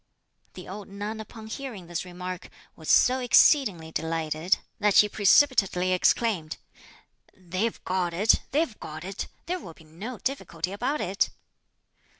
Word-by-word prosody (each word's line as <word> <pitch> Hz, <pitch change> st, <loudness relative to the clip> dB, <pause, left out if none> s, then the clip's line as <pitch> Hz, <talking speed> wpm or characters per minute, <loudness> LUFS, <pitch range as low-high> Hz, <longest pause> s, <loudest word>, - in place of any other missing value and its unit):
The 180 Hz, -, -9 dB
old 200 Hz, +1 st, -8 dB
nun 205 Hz, +2 st, -5 dB
upon 220 Hz, 0 st, -9 dB
hearing 220 Hz, -5 st, -7 dB
this 175 Hz, +1 st, -4 dB
remark 180 Hz, 0 st, -7 dB, 0.3 s
was 160 Hz, -, -9 dB
so 255 Hz, +1 st, +5 dB
exceedingly 230 Hz, -, +4 dB
delighted, 160 Hz, +2 st, 0 dB, 0.2 s
that 210 Hz, -2 st, +2 dB
she 210 Hz, -, +7 dB
precipitately 200 Hz, -4 st, +3 dB
exclaimed, 185 Hz, -3 st, +1 dB, 0.8 s
"They've 185 Hz, +5 st, -2 dB
got 180 Hz, -2 st, -1 dB
it, 200 Hz, +6 st, +3 dB
they've 290 Hz, -5 st, 0 dB
got 155 Hz, +1 st, -8 dB
it! 195 Hz, +2 st, -5 dB, 0.2 s
there 360 Hz, +2 st, -2 dB
will 165 Hz, -, -11 dB
be -, -, -17 dB
no 195 Hz, +11 st, -8 dB
difficulty 180 Hz, -, -3 dB
about 255 Hz, +9 st, -2 dB
it." 195 Hz, +2 st, 0 dB
195 Hz, 140 wpm, -27 LUFS, 175-225 Hz, 0.8 s, she